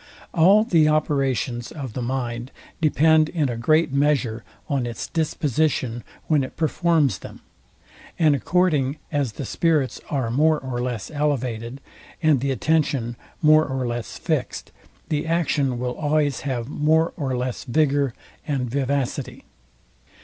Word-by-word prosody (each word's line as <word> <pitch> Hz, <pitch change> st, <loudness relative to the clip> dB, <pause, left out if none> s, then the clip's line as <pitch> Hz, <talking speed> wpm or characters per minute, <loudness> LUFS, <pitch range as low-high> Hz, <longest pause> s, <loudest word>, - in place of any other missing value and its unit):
All 190 Hz, +6 st, +6 dB
the 165 Hz, -9 st, +3 dB
operations 135 Hz, -6 st, 0 dB
of 135 Hz, -7 st, -6 dB
the 125 Hz, -, -4 dB
mind 120 Hz, -1 st, -3 dB, 0.3 s
depend 155 Hz, 0 st, +4 dB
in 155 Hz, -6 st, 0 dB
a 120 Hz, -, -2 dB
great 155 Hz, +6 st, +2 dB
measure 135 Hz, -6 st, +1 dB, 0.2 s
on 135 Hz, -4 st, -1 dB
its 115 Hz, -2 st, -5 dB
disposition, 150 Hz, -6 st, -1 dB, 0.2 s
when 150 Hz, -3 st, +2 dB
it 130 Hz, -, -8 dB
performs 160 Hz, -, +1 dB
them; -, -, -11 dB, 0.8 s
and 155 Hz, -3 st, +4 dB
according 150 Hz, -3 st, +1 dB
as 140 Hz, -7 st, -1 dB
the 140 Hz, -, -5 dB
spirits 155 Hz, -2 st, 0 dB
are 130 Hz, -6 st, -1 dB
more 155 Hz, +5 st, +3 dB
or 130 Hz, -2 st, -4 dB
less 120 Hz, -2 st, -4 dB
elevated, 130 Hz, -4 st, -2 dB, 0.4 s
and 155 Hz, -4 st, +3 dB
the 140 Hz, +3 st, -1 dB
attention 135 Hz, -4 st, 0 dB, 0.3 s
more 155 Hz, 0 st, +6 dB
or 130 Hz, -2 st, -2 dB
less 120 Hz, -1 st, -4 dB
fixed, -, -, -3 dB, 0.4 s
the 150 Hz, +1 st, -1 dB
action 150 Hz, -6 st, +1 dB
will 125 Hz, 0 st, -2 dB
always 150 Hz, -2 st, +1 dB
have 125 Hz, -4 st, -3 dB
more 155 Hz, +3 st, +2 dB
or 135 Hz, -5 st, -2 dB
less 125 Hz, 0 st, -3 dB
vigour 140 Hz, -1 st, +1 dB, 0.3 s
and 130 Hz, -5 st, -1 dB
vivacity. 140 Hz, -1 st, -2 dB
140 Hz, 135 wpm, -23 LUFS, 125-155 Hz, 0.8 s, All